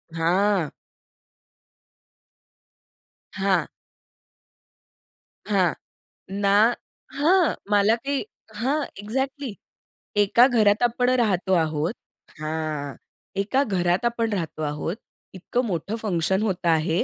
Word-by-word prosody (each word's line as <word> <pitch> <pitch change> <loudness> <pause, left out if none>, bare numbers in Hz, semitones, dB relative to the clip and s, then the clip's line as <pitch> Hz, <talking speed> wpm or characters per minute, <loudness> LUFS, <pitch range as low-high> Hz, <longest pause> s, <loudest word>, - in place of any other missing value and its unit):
हां. 180 0 +2 2.6
हां. 195 -3 +1 1.8
हां. 185 -5 +2 0.7
ना 205 +4 +5 0.5
हां. 345 +2 +4 0.2
मला 205 +2 +4
काही 280 +1 -1 0.3
हां, 275 +7 0
एक्झॅक्टली. 265 +4 -3 0.6
एका 205 +4 +5
घरात 215 -3 +3
आपण 245 +1 +2
राहतो 190 -5 +1
आहोत 160 +2 +1 0.5
हां. 155 -2 -3 0.5
एका 260 +8 +2
घरात 180 -2 0
आपण 230 -1 0
राहतो 165 -5 -3
आहोत, 150 +5 -2 0.4
इतकं 240 +7 -2
मोठं 200 +2 -2
फंक्शन 190 -3 0
होतं 185 -4 0
आहे 160 +2 +2
200 Hz, 90 wpm, -24 LUFS, 170-235 Hz, 2.6 s, ना